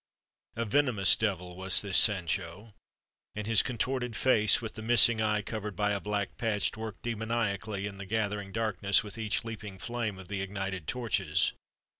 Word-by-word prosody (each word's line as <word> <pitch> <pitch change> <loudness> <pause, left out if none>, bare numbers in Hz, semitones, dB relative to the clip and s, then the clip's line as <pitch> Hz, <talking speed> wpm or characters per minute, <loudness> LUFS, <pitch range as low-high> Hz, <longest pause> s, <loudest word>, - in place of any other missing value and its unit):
A 115 - -1
venomous 115 -5 +4
devil 90 -5 -2
was 95 +2 +3
this 100 -3 -2
Sancho, 100 0 +2 0.6
and 105 -1 -4
his 110 -2 +4
contorted 125 -1 -2
face, 110 -4 +4
with 115 -3 -6
the 110 - -8
missing 115 0 +4
eye 105 -1 +1
covered 105 -2 -5
by 105 -1 +1
a 100 - 0
black 105 -1 -3
patch, 110 -2 0
worked 110 -2 -7
demoniacally 110 -3 -2
in 100 -2 -7
the 100 - -7
gathering 105 -2 -2
darkness 100 -3 +2
with 105 +1 -7
each 110 -1 -1
leaping 105 -4 -7
flame 115 -1 -3
of 95 -1 -11
the 100 0 -3
ignited 95 -3 -4
torches. 120 -3 0
105 Hz, 165 wpm, -30 LUFS, 100-115 Hz, 0.6 s, venomous